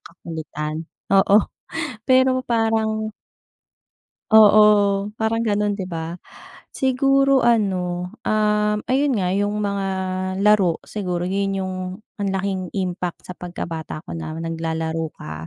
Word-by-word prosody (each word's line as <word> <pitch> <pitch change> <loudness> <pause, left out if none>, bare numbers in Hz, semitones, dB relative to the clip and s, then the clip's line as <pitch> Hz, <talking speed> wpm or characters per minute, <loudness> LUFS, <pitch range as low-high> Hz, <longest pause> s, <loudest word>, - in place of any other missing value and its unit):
kakulitan. 160 -2 -6 0.3
Oo, 195 +2 +5 0.6
pero 255 0 +3
parang 220 -2 0 1.2
Oo, 215 -1 +8 0.6
parang 220 0 0
ganon 205 0 0
'di 190 - -3
ba. 165 0 -5 0.6
Siguro 275 +1 +3
ano, 180 -5 +1 0.2
um, 210 0 +2
ayun 275 +2 +2
nga, 180 -2 0
yung 205 +1 0
mga 200 -1 -1 0.6
laro, 200 -5 +4
siguro 180 -4 -3
yun 195 +1 -1
yung 185 -1 -3 0.4
ang 200 -1 -1
laking 190 -1 -1
impact 180 -2 -3
sa 180 - -7
pagkabata 165 -3 -6
ko - - -9
na 160 -1 -5
naglalaro 165 0 -2
ka, 80 +1 -8
195 Hz, 115 wpm, -22 LUFS, 175-215 Hz, 1.2 s, Oo